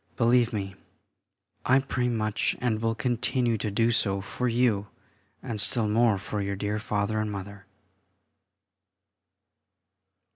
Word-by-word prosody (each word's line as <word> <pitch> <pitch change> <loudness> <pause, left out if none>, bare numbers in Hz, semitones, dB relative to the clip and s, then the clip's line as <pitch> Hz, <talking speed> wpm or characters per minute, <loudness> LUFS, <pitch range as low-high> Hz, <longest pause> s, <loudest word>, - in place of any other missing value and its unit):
Believe 120 -1 +4
me, 100 -3 -3 0.9
I 130 - +4
pray 130 -2 0
much, 110 -3 0
and 115 -3 0
will 115 0 0
continue 120 0 +1
to 105 - -2
do 115 +3 +2
so 100 -4 +1
for 125 +5 -3
you, 115 -4 +2 0.6
and 115 -5 -2
still 110 0 +1
more 110 0 +3
for 100 +2 -4
your 100 0 -2
dear 105 +2 -2
Father 105 0 -1
and 110 -1 -1
Mother.... 100 0 -8
110 Hz, 125 wpm, -27 LUFS, 100-120 Hz, 0.9 s, Believe